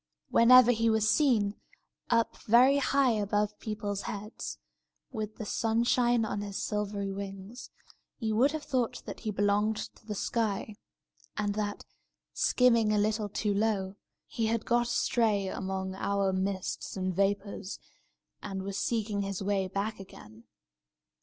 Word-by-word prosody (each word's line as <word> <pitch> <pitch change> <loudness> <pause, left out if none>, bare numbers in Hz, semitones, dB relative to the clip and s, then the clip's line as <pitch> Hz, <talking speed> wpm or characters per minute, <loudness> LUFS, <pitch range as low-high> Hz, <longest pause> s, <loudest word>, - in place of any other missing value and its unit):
Whenever 245 +1 +7
he 230 -1 +2
was 220 -1 +2
seen, 220 -6 +2 0.5
up 230 -1 +2
very 250 +5 +6
high 275 -1 +3
above 210 -1 0
people's 205 -2 -3
heads, 210 +2 -6 0.5
with 215 -3 -5
the 215 - -6
sunshine 235 +2 +2
on 205 -1 -3
his 200 -1 -5
silvery 205 -1 -2
wings, 195 +3 -7 0.5
you 220 -3 -1
would 265 +6 +4
have 310 -1 -4
thought 250 -4 -1
that - - -7
he 220 - -4
belonged 205 +1 +1
to - - -8
the 210 - -3
sky, 215 0 -2 0.6
and 205 -1 0
that, 205 0 -3 0.5
skimming 235 -4 +3
a 210 - +2
little 210 0 0
too 205 +1 -1
low, 200 -2 0 0.3
he 225 -2 -2
had 230 0 -1
got 240 0 +2
astray 220 -5 +1
among 190 0 -3
our 195 0 0
mists 190 0 -3
and 185 -1 -2
vapours, 200 0 -1 0.6
and 195 -1 -5
was 195 0 -4
seeking 215 -3 -1
his 195 -1 -3
way 195 -1 0
back 200 +3 -3
again. 115 - -13
210 Hz, 140 wpm, -30 LUFS, 200-230 Hz, 0.6 s, Whenever